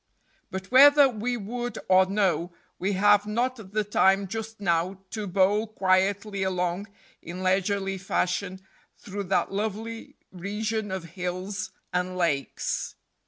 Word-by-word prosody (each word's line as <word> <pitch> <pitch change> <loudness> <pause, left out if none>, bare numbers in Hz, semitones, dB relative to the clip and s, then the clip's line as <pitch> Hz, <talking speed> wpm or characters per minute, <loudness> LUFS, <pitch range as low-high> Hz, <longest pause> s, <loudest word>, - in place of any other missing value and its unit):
But 190 +1 -6
whether 285 +2 +8
we 245 0 -2
would 240 +3 -4
or 185 0 +5
no, 190 -3 0 0.3
we 195 +2 0
have 205 +1 +4
not 245 +4 0
the 215 0 +1
time 195 -1 +3
just 220 +2 -6
now 180 0 0
to 215 -2 -4
bowl 200 +4 +2
quietly 195 0 +1
along 185 +1 -1 0.3
in 180 +3 -7
leisurely 195 +1 0
fashion 185 0 -1 0.4
through 200 0 -6
that 190 +1 +1
lovely 220 +3 -4 0.2
region 210 +3 -3
of 190 -2 -4
hills 185 +1 -4 0.2
and 180 0 -1
lakes. 150 -6 -1
195 Hz, 125 wpm, -26 LUFS, 185-215 Hz, 0.4 s, whether